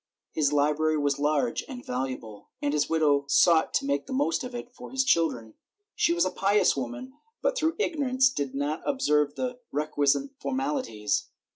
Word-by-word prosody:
His 150 Hz, -3 st, +1 dB
library 150 Hz, +2 st, +2 dB
was 145 Hz, -1 st, 0 dB
large 155 Hz, -, 0 dB
and 255 Hz, -4 st, -8 dB
valuable, 125 Hz, -5 st, -5 dB
and 145 Hz, 0 st, -1 dB
his 150 Hz, -1 st, +1 dB
widow 150 Hz, -3 st, +2 dB
sought 160 Hz, +3 st, +4 dB
to -, -, +1 dB
make 140 Hz, 0 st, -1 dB
the -, -, -5 dB
most 270 Hz, 0 st, 0 dB
of 250 Hz, -1 st, -6 dB
it 240 Hz, 0 st, -7 dB
for -, -, -10 dB
his 265 Hz, 0 st, +1 dB
children. 155 Hz, -, +1 dB, 0.4 s
She -, -, +2 dB
was 170 Hz, +1 st, +2 dB
a 185 Hz, -, -1 dB
pious 200 Hz, +3 st, +2 dB
woman 135 Hz, -, -5 dB, 0.3 s
but -, -, +1 dB
through 325 Hz, -7 st, 0 dB
ignorance 265 Hz, -9 st, +2 dB
did 140 Hz, -, -3 dB
not 145 Hz, +3 st, -2 dB
observe 150 Hz, -, +1 dB
the 250 Hz, -1 st, -3 dB
requisite 150 Hz, -, +1 dB
formalities. 265 Hz, -, -2 dB
155 Hz, 170 wpm, -27 LUFS, -, 0.4 s, sought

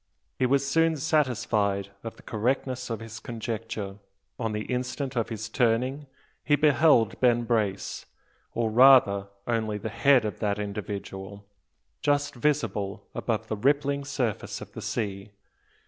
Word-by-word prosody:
He 130 Hz, -, +3 dB
was 140 Hz, +1 st, +2 dB
soon 165 Hz, +2 st, +3 dB
satisfied 110 Hz, -10 st, +1 dB
of 115 Hz, -, -6 dB
the -, -, -17 dB
correctness 125 Hz, +3 st, -1 dB
of 115 Hz, -1 st, -3 dB
his 115 Hz, 0 st, -8 dB
conjecture. 110 Hz, -3 st, -5 dB, 0.4 s
On 115 Hz, -3 st, -1 dB
the 105 Hz, 0 st, -2 dB
instant 130 Hz, +2 st, -3 dB
of 115 Hz, -2 st, 0 dB
his 110 Hz, -1 st, -4 dB
turning 125 Hz, +5 st, 0 dB, 0.4 s
he 145 Hz, -, +4 dB
beheld 145 Hz, -5 st, +4 dB
Ben 120 Hz, -2 st, +3 dB
Brace, 110 Hz, -5 st, -1 dB, 0.5 s
or 115 Hz, -2 st, 0 dB
rather, 115 Hz, -5 st, +6 dB, 0.2 s
only 110 Hz, -3 st, -1 dB
the 110 Hz, +2 st, -4 dB
head 130 Hz, +1 st, +4 dB
of 105 Hz, -, -4 dB
that 105 Hz, -2 st, 0 dB
individual, 100 Hz, -1 st, -6 dB, 0.6 s
just 145 Hz, 0 st, +1 dB
visible 115 Hz, -7 st, -1 dB
above 110 Hz, -2 st, -2 dB
the 110 Hz, -, -2 dB
rippling 140 Hz, +4 st, +1 dB
surface 125 Hz, -6 st, -2 dB
of -, -, -10 dB
the -, -, -8 dB
sea. 100 Hz, -3 st, -3 dB
115 Hz, 140 wpm, -27 LUFS, 105-135 Hz, 0.6 s, rather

